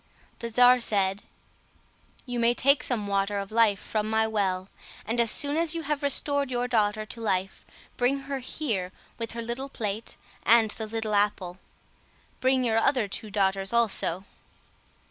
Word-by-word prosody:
The 235 0 -5
czar 250 +2 +6
said, 200 -3 +2 1.0
"You 245 -2 -4
may 235 +1 +3
take 275 +2 +3
some 235 -5 -2
water 200 0 -1
of 195 0 -5
life 220 -3 +3
from 215 0 -3
my 220 0 +2
well, 195 -4 -1 0.4
and 230 +2 -2
as 235 -1 +3
soon 285 +6 +1
as 335 0 +1
you 330 - -3
have 295 0 -2
restored 285 -1 +1
your 245 -1 -1
daughter 215 -3 0
to 230 +2 -8
life, 190 -3 -2 0.3
bring 265 +3 +1
her 275 0 -4
here 225 -9 -3 0.3
with 230 -1 -4
her 235 0 -5
little 240 +4 -4
plate 215 -3 -4 0.3
and 225 -2 +4
the 220 0 -6
little 220 -1 -3
apple; 200 -3 0 0.8
bring 260 0 +2
your 225 -2 +2
other 250 -3 +1
two 210 +2 -6
daughters 195 0 0
also." 200 -5 +3
225 Hz, 165 wpm, -26 LUFS, 205-250 Hz, 1.0 s, czar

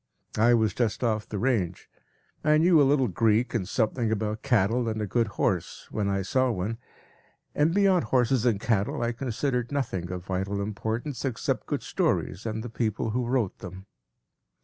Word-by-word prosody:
I 120 +2 +5
was 110 -2 +2
just 120 0 -1
off 110 -3 0
the 105 - -3
range; 100 -7 -1 0.6
I 150 0 +4
knew 165 0 +5
a 135 - +4
little 135 -3 +3
Greek 110 +4 +1
and 100 -7 -2
something 115 -1 0
about 110 +1 -2
cattle 120 -2 +2
and 110 0 -3
a 105 - -1
good 115 +3 +1
horse 90 -4 -1
when 105 -2 -1
I 100 0 0
saw 130 +6 +1
one, 115 +1 -3 0.7
and 150 +3 +2
beyond 190 - +3
horses 125 +1 +2
and 115 -5 +2
cattle 105 +1 0
I 120 - +1
considered 125 +1 -2
nothing 95 -11 -2
of 90 -1 -6
vital 95 +1 -2
importance 110 +6 -3
except 130 -5 -2
good - - -2
stories 95 +5 -1
and 110 0 -3
the - - -5
people 110 -1 -1
who 120 +1 -1
wrote 120 -6 0
them. 95 -2 -9
115 Hz, 175 wpm, -27 LUFS, 105-125 Hz, 0.7 s, I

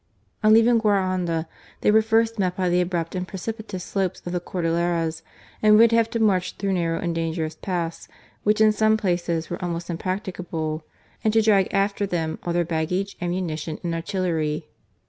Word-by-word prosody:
On 215 - +6
leaving 230 +1 +6
Guaranda, 185 -6 +1 0.3
they - - +4
were 220 +1 +6
first 225 0 +1
met 185 -2 +1
by 185 -1 0
the 175 +1 +3
abrupt 175 -2 -2
and 180 -1 -3
precipitous 205 -1 -5
slopes 190 -2 -2
of 175 - -4
the 180 - 0
Cordilleras, 170 -2 -1 0.4
and 210 0 +6
would 230 +1 +6
have 230 -1 +3
to 230 - -2
march 190 -5 +2
through 195 -1 -1
narrow 165 -2 0
and 170 -1 -2
dangerous 165 -1 -2
paths, 170 0 -4 0.3
which 210 +1 +2
in 215 0 +6
some 220 +1 +3
places 175 -5 -1
were 175 - -4
almost 170 0 -3
impracticable, 170 -4 -3 0.4
and 220 - +3
to 225 - +5
drag 200 -3 +3
after 200 0 +1
them 165 -4 -2
all 175 - -3
their 170 0 +1
baggage, 175 +5 -2
ammunition, 170 -3 -3
and 170 -1 -2
artillery. 165 -3 -1
180 Hz, 175 wpm, -24 LUFS, 165-210 Hz, 0.4 s, On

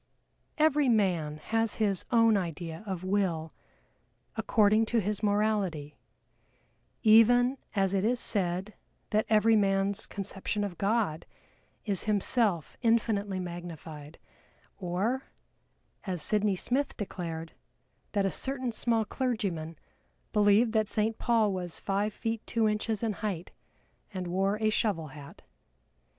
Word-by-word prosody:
Every 300 -3 +3
man 175 -9 +1
has 225 +7 0
his 200 -4 0
own 230 -2 +5
idea 170 -2 -4
of 185 -2 -4
Will 185 -5 -1 0.8
according 215 0 +3
to 235 - 0
his 210 0 -2
morality 205 -8 0 1.1
even 245 +4 +5 0.2
as 195 -1 +2
it 195 -1 +1
is 240 +3 +2
said 190 -1 +2 0.4
that 215 0 +1
every 220 +1 +4
man's 195 -1 +1
conception 200 +1 -3
of 190 -4 -5
God 200 -6 0 0.6
is 200 -4 0
himself 205 - +1
infinitely 215 -5 +1
magnified 165 -4 -8 0.6
or, 200 +9 -1 0.8
as 180 -4 -1
SYDNEY 210 -2 +2
SMITH 265 +9 -1
declared, 165 -5 -5 0.6
that 200 -2 +1
a 195 - +1
certain 260 -2 -2
small 225 0 +1
clergyman 195 - -3 0.6
believed 210 +2 +4
that 215 -2 +2
Saint 220 +1 -1
Paul 225 -4 +2
was 180 -2 -5
five 200 +2 -1
feet 225 +1 -3
two 225 -2 +1
inches 215 +1 -1
in 220 -2 0
height, 195 -4 -4 0.6
and 185 -3 -4
wore 195 +3 0
a 215 -1 +2
shovel 180 -9 -1
hat. 140 0 -12
205 Hz, 120 wpm, -29 LUFS, 180-225 Hz, 1.1 s, own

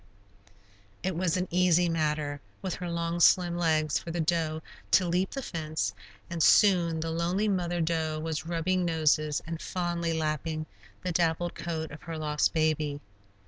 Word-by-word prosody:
It 185 -1 -1
was 175 0 +1
an 185 0 -1
easy 180 0 +4
matter, 150 -3 -1 0.2
with 190 - -2
her 180 -1 -5
long, 170 0 -2
slim 175 0 +5
legs, 155 -3 +1
for - - -9
the 170 +1 -3
doe 160 -1 0 0.3
to 185 - +4
leap 180 +2 +1
the 270 - -5
fence, 155 - -2 0.3
and 170 -1 -4
soon 170 -4 +5
the 165 0 -2
lonely 175 +6 0
mother 175 -3 0
doe 160 -1 0
was 160 0 -3
rubbing 175 +2 0
noses 155 -3 +1
and 165 0 -5
fondly 170 -2 -2
lapping 155 0 -2 0.4
the 180 - -1
dappled 170 0 +1
coat 160 -2 -4
of 145 - -10
her 165 -1 -6
lost 150 -1 +1
baby. 155 -2 0
165 Hz, 160 wpm, -29 LUFS, 155-175 Hz, 0.4 s, slim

